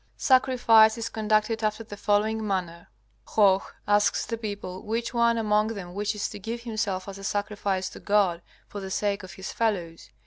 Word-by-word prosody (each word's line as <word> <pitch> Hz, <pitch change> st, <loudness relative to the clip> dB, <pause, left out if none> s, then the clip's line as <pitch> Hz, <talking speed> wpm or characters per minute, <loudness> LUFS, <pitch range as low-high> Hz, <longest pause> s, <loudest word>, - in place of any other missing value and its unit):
Sacrifice 240 Hz, -4 st, +5 dB
is 230 Hz, -, -3 dB
conducted 215 Hz, +1 st, 0 dB
after 215 Hz, +1 st, -1 dB
the 210 Hz, -2 st, -9 dB
following 210 Hz, +2 st, 0 dB
manner: 175 Hz, -3 st, -3 dB, 0.4 s
Hoh 195 Hz, -3 st, +4 dB, 0.3 s
asks 205 Hz, 0 st, +2 dB
the 230 Hz, -, -3 dB
people 205 Hz, -4 st, -6 dB
which 230 Hz, +3 st, -3 dB
one 235 Hz, -1 st, +3 dB
among 210 Hz, -1 st, +2 dB
them 180 Hz, -3 st, -7 dB
wishes 205 Hz, +1 st, -2 dB
to -, -, -8 dB
give 230 Hz, +4 st, -5 dB
himself 215 Hz, -5 st, -2 dB
as 195 Hz, 0 st, -8 dB
a -, -, -10 dB
sacrifice 205 Hz, -2 st, -2 dB
to -, -, -11 dB
God 195 Hz, -5 st, +2 dB, 0.3 s
for 205 Hz, -, -7 dB
the 190 Hz, -, -6 dB
sake 200 Hz, +1 st, -1 dB
of 185 Hz, -2 st, -10 dB
his 190 Hz, +1 st, -7 dB
fellows. 180 Hz, -8 st, -2 dB
210 Hz, 175 wpm, -26 LUFS, 195-220 Hz, 0.4 s, Sacrifice